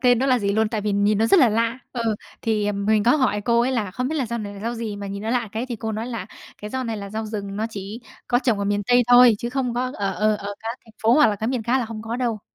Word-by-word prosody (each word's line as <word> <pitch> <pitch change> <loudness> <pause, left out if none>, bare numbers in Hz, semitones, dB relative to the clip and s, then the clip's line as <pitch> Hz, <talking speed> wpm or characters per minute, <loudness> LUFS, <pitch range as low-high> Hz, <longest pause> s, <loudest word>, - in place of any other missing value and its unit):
tên 245 -2 +4
nó 265 - +1
là 255 -2 +3
gì 200 -2 0
luôn, 220 +1 +2
tại 220 -1 -2
vì 205 0 -1
nhìn 205 +1 +2
nó 225 - +3
rất 380 - +5
là 250 - +6
lạ. 230 +3 0
Ừ, 230 -3 -1 0.3
thì 210 -2 0
mình 205 +1 +1
có 245 +7 +4
hỏi 250 -7 +1
cô 235 +2 +2
ấy 250 +2 +1
là 215 -6 -1
"Không 250 +7 -2
biết 315 - -2
là 270 -5 0
rau 235 +1 -3
này 205 -2 -6
là 200 - -10
rau 230 +3 -3
gì 225 -3 -4
mà 200 0 -6
nhìn 200 +1 -5
nó 220 - -2
lạ 240 -3 0
cái?" 230 +3 -3
Thì 240 - -4
cô 220 0 -4
nói 220 +3 -3
là 230 -3 -5 0.4
"Cái 210 - -5
rau 260 -1 -2
này 225 -1 -3
là 200 -1 -7
rau 220 +1 -4
rừng, 200 -2 -5
nó 220 - -1
chỉ 205 +3 -7 0.3
có 245 - +3
trồng 240 -5 +1
ở 200 - -1
miền 205 0 0
Tây 245 0 +5
thôi 245 -2 +8
chứ 235 - -4
không 255 -2 -1
có, 255 +2 -1
ở 195 -1 -1
ờ 215 +1 +2
ở 205 0 -6
các 230 +2 -5
thành 225 - -18
phố 225 +2 +4
hoặc 300 0 +6
là 210 - 0
cái 220 +3 -2
miền 250 -3 -1
khác 245 +4 +1
là 245 - -1
hông 220 -1 -7
có 225 +1 -4
đâu." 235 -4 -1
225 Hz, 330 wpm, -23 LUFS, 210-245 Hz, 0.4 s, thôi